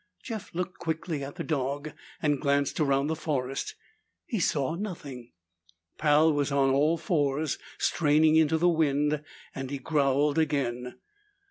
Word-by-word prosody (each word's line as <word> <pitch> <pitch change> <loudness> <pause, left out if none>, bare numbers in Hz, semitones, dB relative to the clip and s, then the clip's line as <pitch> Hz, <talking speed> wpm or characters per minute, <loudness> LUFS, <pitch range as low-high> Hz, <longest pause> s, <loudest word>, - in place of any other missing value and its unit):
Jeff 220 -5 -6
looked 180 +1 -3
quickly 160 -3 -3
at 140 +1 -7
the - - -4
dog 145 0 -2 0.3
and 145 -2 +1
glanced 140 0 +1
around 140 -2 +2
the 160 +2 -1
forest. 145 - -3 0.5
He 235 - -2
saw 150 -3 +1
nothing. 165 - -6 0.7
Pal 155 +1 +4
was 145 -1 0
on 135 -1 +3
all 150 +5 +3
fours, 155 -3 0 0.2
straining 155 0 +3
into 160 0 +4
the 175 +2 +3
wind, 150 -2 +2 0.3
and 135 -1 -5
he 140 - -3
growled 145 +1 +2
again. 125 -5 -1
150 Hz, 140 wpm, -28 LUFS, 140-160 Hz, 0.7 s, Pal